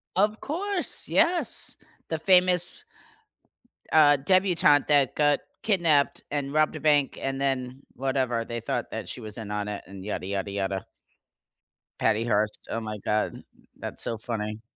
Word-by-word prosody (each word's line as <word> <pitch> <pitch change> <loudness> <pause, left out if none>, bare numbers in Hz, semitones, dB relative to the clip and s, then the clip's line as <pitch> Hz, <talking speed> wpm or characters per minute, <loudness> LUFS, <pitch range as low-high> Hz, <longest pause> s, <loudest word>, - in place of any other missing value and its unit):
Of 210 +3 +2
course, 370 +5 -1
yes. 340 +1 +1 0.3
The 160 - -2
famous 180 0 +4 1.1
uh, 150 -2 +6
debutante 170 -1 +3
that 145 -3 +3
got 145 -1 +3 0.2
kidnapped, 170 -9 +2
and 140 -1 -2
robbed 155 +1 +2
a - - -5
bank, 145 -3 +2
and 135 0 -2
then, 130 -1 -2
whatever. 130 -3 -1
They 120 0 -4
thought 115 - -3
that - - -5
she - - -6
was 110 -1 -7
in 110 -3 -6
on 105 0 -2
it, 105 -1 -5
and 95 0 -10
yada, 105 -2 -4
yada, 100 +1 -3
yada. 95 -1 -3 1.1
Patty 110 +1 +1
Hearst, 105 -2 -1
oh 115 - -2
my 110 -1 -5
God. 105 +2 -2 0.3
That's - - -5
so 115 - -2
funny. 110 -1 -5
135 Hz, 150 wpm, -26 LUFS, 110-160 Hz, 1.1 s, uh